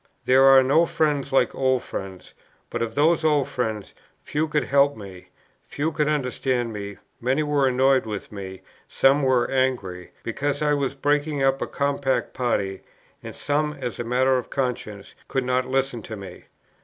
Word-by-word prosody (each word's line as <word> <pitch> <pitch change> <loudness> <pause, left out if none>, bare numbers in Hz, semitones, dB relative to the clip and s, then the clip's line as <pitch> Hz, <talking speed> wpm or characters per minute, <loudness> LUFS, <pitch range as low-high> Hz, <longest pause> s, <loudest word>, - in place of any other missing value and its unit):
There 130 +1 +5
are 135 -1 +8
no 160 +6 +3
friends 145 -4 0
like 135 - +2
old 130 -2 +1
friends; 95 -1 -8 0.4
but - - -3
of 115 -1 -3
those 160 +3 +3
old 150 -3 +2
friends, 110 -5 -3 0.3
few 155 +2 -1
could 150 -1 0
help 140 0 +3
me, 95 -4 -11 0.4
few 155 +3 -2
could 150 -1 0
understand 125 -4 -1
me, 100 -1 -6 0.2
many 130 +5 0
were 145 -2 +2
annoyed 130 -1 +3
with 105 -2 -6
me, 95 -2 -8 0.2
some 135 +2 +3
were 130 -3 +2
angry, 120 -10 -1
because 145 +5 -2
I 150 0 +2
was 140 -1 -1
breaking 145 0 0
up 135 0 +2
a - - -1
compact 140 -1 -1
party, 100 -6 -1 0.4
and - - -9
some, 150 +1 -1
as 130 -5 -6
a - - -1
matter 130 +2 +2
of 125 - -9
conscience, 120 -6 -4
could 135 - -1
not 125 0 0
listen 135 -3 -1
to 110 - -7
me. 95 -3 -10
130 Hz, 170 wpm, -24 LUFS, 115-145 Hz, 0.4 s, are